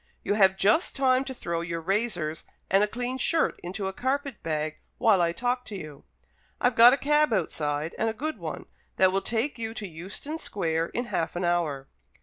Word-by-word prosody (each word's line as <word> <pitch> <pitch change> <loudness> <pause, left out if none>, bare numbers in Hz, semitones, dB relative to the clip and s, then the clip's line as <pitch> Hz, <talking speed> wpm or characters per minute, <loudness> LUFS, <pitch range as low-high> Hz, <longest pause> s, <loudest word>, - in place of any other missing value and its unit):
You'll 205 - 0
have 190 -2 +5
just 215 - +3
time 260 -1 +3
to 270 - -5
throw 170 -7 -3
your 170 0 -3
razors 175 -4 -1 0.3
and 195 +2 +5
a - - +2
clean 245 +4 -3
shirt 330 +3 +1
into 190 +3 -5
a 190 - -3
carpet 270 +1 -2
bag 155 -1 -2 0.2
while 205 -5 +4
I 170 -1 +2
talk 245 +6 -1
to 210 - -7
you. 155 -6 -9 0.5
I've 245 - +2
got 230 +2 +9
a 275 - +3
cab 295 0 +3
outside, 155 -5 -1
and 225 - +2
a - - -3
good 310 +7 -4
one, - - -6 0.3
that 185 0 +4
will 195 +1 +1
take 235 +6 -1
you 225 0 -4
to 210 - -5
Euston 190 - -6
Square 165 - -1
in 245 - -1
half 165 -8 -2
an 175 - -2
hour." 160 -6 0
200 Hz, 200 wpm, -27 LUFS, 170-245 Hz, 0.5 s, got